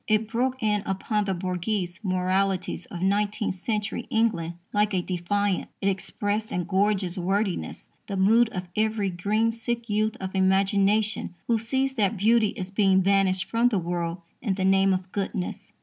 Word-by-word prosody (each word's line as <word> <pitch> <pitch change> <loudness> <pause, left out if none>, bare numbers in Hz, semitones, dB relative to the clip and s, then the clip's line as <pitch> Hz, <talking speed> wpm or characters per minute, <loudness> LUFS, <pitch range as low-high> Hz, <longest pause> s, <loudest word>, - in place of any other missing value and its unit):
It 215 0 +2
broke 255 +1 -1
in 210 -1 +2
upon 205 +2 -1
the 190 -1 -1
bourgeois 185 +2 -1 0.2
moralities 185 -1 0
of 175 0 -6
nineteenth 205 +1 +1
century 210 +4 -3
England 205 -7 0 0.2
like 210 -1 +2
a 180 - +2
defiance. 190 +2 -1
It 195 - +1
expressed 205 +2 -2
in 180 - -1
gorgeous 190 0 +1
wordiness 195 +2 -2 0.2
the 200 - -3
mood 225 +5 +4
of 185 -4 -4
every 215 -2 +1
green 210 +6 +1
sick 235 0 -4
youth 215 +1 +1
of 190 0 -5
imagination 195 +1 +2
who 230 -1 +2
sees 265 +4 0
that 215 -3 +1
beauty 220 +2 +4
is 185 0 -5
being 195 -2 +4
banished 190 -1 +2
from 235 +2 +2
the 215 - 0
world 170 0 -3 0.2
in 205 -6 0
the 190 -1 -1
name 195 0 +4
of 185 0 -2
goodness. 195 -2 -4
200 Hz, 165 wpm, -26 LUFS, 185-215 Hz, 0.2 s, mood